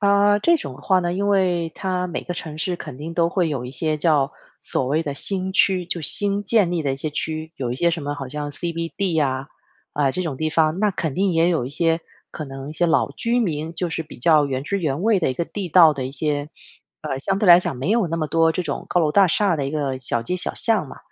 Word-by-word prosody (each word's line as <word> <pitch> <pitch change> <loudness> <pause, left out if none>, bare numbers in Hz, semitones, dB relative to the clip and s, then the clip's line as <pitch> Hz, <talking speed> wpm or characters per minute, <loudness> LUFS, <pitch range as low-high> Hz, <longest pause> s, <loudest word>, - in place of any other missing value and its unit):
呃， 200 0 +4
这 340 +9 +4
种 140 - -7
的 - - -15
话 190 - +3
呢， 175 -1 -1
因 200 +2 -1
为 180 -4 +1
它 185 -1 -2
每 175 - -4
个 175 - -5
城 160 -3 -7
市 175 +3 -1
肯 150 -6 -9
定 165 +3 -6
都 170 -1 +2
会 175 -2 0
有 135 -5 -3
一 125 - -6
些 155 +3 -1
叫 150 -3 +2 0.3
所 - - -1
谓 150 +5 +1
的 145 -3 -4
新 190 +4 -1
区， 185 -2 +2
就 170 - -3
新 200 +6 +2
建 205 -5 +3
立 175 -2 -1
的 140 -2 0
一 - - -3
些 145 +3 -2
区。 155 +1 -4
有 125 -3 -3
一 - - -4
些 170 +4 +2
什 165 -2 -3
么 145 0 -3
好 135 -3 -6
像 145 +1 -4
CBD 170 +4 -3
呀， 135 -3 0 0.5
呃， 140 -2 +1
这 185 - -2
种 155 -6 -3
地 155 +3 -1
方， 160 +2 +2
那 210 -1 +3
肯 160 -6 -3
定 190 +2 +1
也 165 +1 +3
有 165 -8 +1
一 125 - -6
些 165 +2 +1 0.3
可 155 - -6
能 135 0 -8
一 - - -6
些 175 - +1
老 165 - +2
居 235 +1 0
民 160 -6 -2
就 175 +1 -2
是 165 0 -3
比 155 - -13
较 150 +3 +4
原 135 -2 -2
汁 200 +6 -1
原 155 -3 -2
味 220 -1 +3
的 165 - 0
一 - - -3
个 170 - -1
地 200 -3 -5
道 165 -2 +7
的 135 -2 -4
一 130 - -5
些 145 +1 -2 0.5
呃， 135 - -3
相 195 +8 -1
对 200 - +1
来 175 0 +10
讲 180 - -3
没 135 +9 -2
有 225 -3 +2
那 165 0 -3
么 155 - -1
多 165 +1 +3
这 180 - -2
种 - - -4
高 180 - +3
楼 155 -2 +2
大 195 +5 +5
厦 185 +1 +2
的 140 - -2
一 135 - -3
个 140 -3 -2
小 120 -2 -1
街 180 +10 -2
小 180 - -1
巷 220 -9 +1
嘛。 - - -11
165 Hz, 295 characters per minute, -22 LUFS, 145-185 Hz, 0.5 s, 来